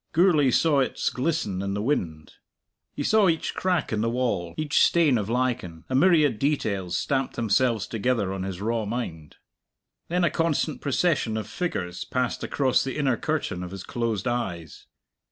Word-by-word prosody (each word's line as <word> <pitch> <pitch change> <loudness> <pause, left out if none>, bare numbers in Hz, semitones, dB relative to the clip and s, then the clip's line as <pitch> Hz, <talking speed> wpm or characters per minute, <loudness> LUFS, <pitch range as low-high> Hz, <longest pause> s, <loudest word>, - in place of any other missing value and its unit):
Gourlay 160 -5 +4
saw 145 +3 +3
its 130 - 0
glisten 130 - -1
in 100 0 -2
the - - -2
wind. 80 - -2 0.6
He 145 - -3
saw 210 +2 +4
each 165 -1 -1
crack 180 -9 0
in 105 - 0
the 115 - +1
wall, 115 -9 -1
each 155 0 +1
stain 160 -6 +4
of 105 -2 -1
lichen; 120 -9 -2
a - - -3
myriad 150 - +4
details 100 - -1
stamped 135 -2 -1
themselves 115 -1 +1
together 110 -4 -1
on 95 - -4
his 95 -1 -5
raw 115 +1 -1
mind. 95 -9 -5 0.7
Then 180 +1 0
a 170 - +3
constant 165 -2 0
procession 140 -6 +1
of 110 -2 -4
figures 95 - -3
passed 125 -1 -2
across 130 -3 +1
the 135 +1 -4
inner 135 -4 +2
curtain 150 - -2
of 90 - -5
his 95 0 -8
closed 115 -1 -2
eyes. 95 -10 -4
125 Hz, 170 wpm, -25 LUFS, 100-150 Hz, 0.7 s, Gourlay